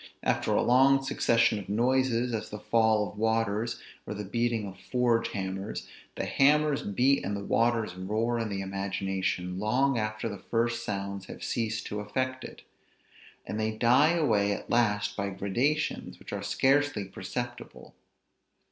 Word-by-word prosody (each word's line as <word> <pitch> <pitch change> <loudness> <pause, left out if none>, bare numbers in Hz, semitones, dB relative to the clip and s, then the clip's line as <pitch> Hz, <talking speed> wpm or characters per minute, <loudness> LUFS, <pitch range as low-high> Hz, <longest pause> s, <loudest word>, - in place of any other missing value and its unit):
After - - +1
a - - +3
long 135 +2 +5
succession 115 -5 +2
of 95 - -10
noises, 125 +2 +1
as 110 - -3
the 105 - -6
fall 110 -1 +2
of 105 - -11
waters, 110 0 0 0.3
or 105 - -4
the 105 - -4
beating 115 +1 0
of 95 -1 -9
forge 120 -2 +1
hammers, 95 +1 -4 0.3
the - - -2
hammers 150 +1 +3
beat 130 +6 +2
and 100 +1 -2
the 100 - -6
waters 115 -4 +1
roar 110 +6 -1
in 115 -2 -2
the 100 -1 -3
imagination 95 -1 -2
long 125 +5 +2
after 110 +1 -2
the 100 -3 -6
first 120 0 -1
sounds 100 -3 -4
have - - -9
ceased 110 -2 -2
to 105 - -4
affect 130 +5 -2
it; - - -10 0.8
and 105 - -4
they 110 0 -1
die 130 +8 +5
away 105 -12 +2
at - - -7
last 105 -3 +2
by 100 0 -2
gradations 120 +11 -1
which - - -10
are 100 - -3
scarcely 135 +2 +2
perceptible. 120 +6 -7
110 Hz, 155 wpm, -29 LUFS, 100-125 Hz, 0.8 s, long